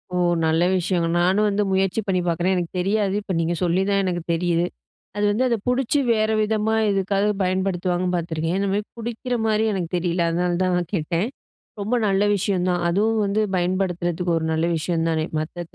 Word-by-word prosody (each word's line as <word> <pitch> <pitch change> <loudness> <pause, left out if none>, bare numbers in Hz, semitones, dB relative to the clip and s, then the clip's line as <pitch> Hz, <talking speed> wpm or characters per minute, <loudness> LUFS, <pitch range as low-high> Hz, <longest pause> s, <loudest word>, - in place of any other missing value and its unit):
ஓ! - - +1 0.3
நல்ல 160 +1 +2
விஷயங்க. 175 -2 0
நானும் 190 +4 +3
வந்து 205 +1 +1
முயற்சி 190 +3 +1
பண்ணி 185 -1 +1
பார்க்குறேன். 175 +3 +1
எனக்கு 175 -2 -2
தெரியாது, 200 +1 +1
இப்ப 195 - -4
நீங்க 165 +1 0
சொல்லி 180 +1 +2
தான் 200 0 +2
எனக்கு 175 -2 -1
தெரியுது. 170 0 +1 0.5
அது 205 - 0
வந்து 235 +5 +1
அத 240 - +2
புடிச்சு 265 +3 +1
வேற 215 -1 +2
விதமா 215 +1 0 0.2
எதுக்காக 195 0 +1 0.2
பயன்படுத்துவாங்கன்னு 185 -1 0
பார்த்துருக்கேன். 165 0 -2
இந்த 200 0 0
மாரி 210 - 0
குடிக்கிற 240 +2 -3
மாரி 215 0 +2
எனக்கு 180 -4 -2
தெரியல 175 0 0
அதனால 175 +1 0
தான் 185 -1 +1
நான் 175 -2 -3
கேட்டேன். 170 +3 0 0.5
ரொம்ப 220 +5 0
நல்ல 195 +1 +2
விஷயம் 185 -2 0
தான் 175 -1 0
அதுவும் 215 +5 +1
வந்து 200 +2 0 0.2
பயன்படுத்துறதுக்கு 175 -1 -1
ஒரு 160 - -2
நல்ல 160 +1 +1
விஷயம் 165 +1 -1
தானே 160 -1 0 0.2
மத்த 170 +2 -5
185 Hz, 180 wpm, -22 LUFS, 175-205 Hz, 0.5 s, நானும்